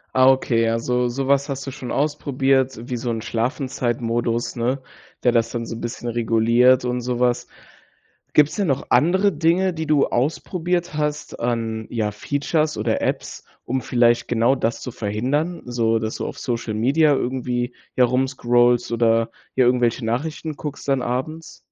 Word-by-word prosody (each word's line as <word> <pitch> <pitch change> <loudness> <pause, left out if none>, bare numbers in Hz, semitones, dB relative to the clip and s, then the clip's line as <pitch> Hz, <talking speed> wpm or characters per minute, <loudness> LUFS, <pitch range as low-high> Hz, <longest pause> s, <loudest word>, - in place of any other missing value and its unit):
Ah, 130 0 +6
okay. 115 -3 +2
Also, 125 +2 0
sowas 135 +3 0
hast 135 0 -4
du 135 - -5
schon 125 -1 -7
ausprobiert. 135 -3 +1
Wie 125 - -3
so 120 +1 -3
'n 115 -1 -2
Schlafenzeit-Modus, 120 -1 -1
ne, 125 +3 -1 0.4
der 125 - +4
das 115 -1 +2
dann 115 -1 -4
so 115 - -6
'n 115 - -8
bisschen 120 0 -5
reguliert 120 +2 +3
und 125 0 -1
sowas. 125 0 0 0.9
Gibt's 150 +4 +4
denn 200 - 0
noch 135 -3 -1
andere 190 +6 +4
Dinge, 170 +4 +2
die 160 -2 -4
du 150 -2 +3
ausprobiert 175 +6 -1
hast, 150 0 -3
an 115 -2 -2
ja, 110 -3 -1
Features 145 - -1
oder 110 +1 0
Apps, - - -3 0.2
um 130 +1 -2
vielleicht 120 -1 +2
genau 120 +3 +2
das 115 -2 -1
zu - - -5
verhindern, 130 +10 -2
so 115 -2 0
dass 110 0 -3
du - - -3
auf - - -7
Social 115 -4 -3
Media 145 +7 +3
irgendwie, 125 -1 -2 0.2
ja, 130 - +3
rumscrollst 120 -1 +2
oder, 115 -1 +2 0.2
ja, 130 - +4
irgendwelche 120 -1 +2
Nachrichten 150 +6 -3
guckst 145 -1 -7
dann 135 -2 +2
abends? 155 +7 -4
125 Hz, 160 wpm, -22 LUFS, 115-140 Hz, 0.9 s, Ah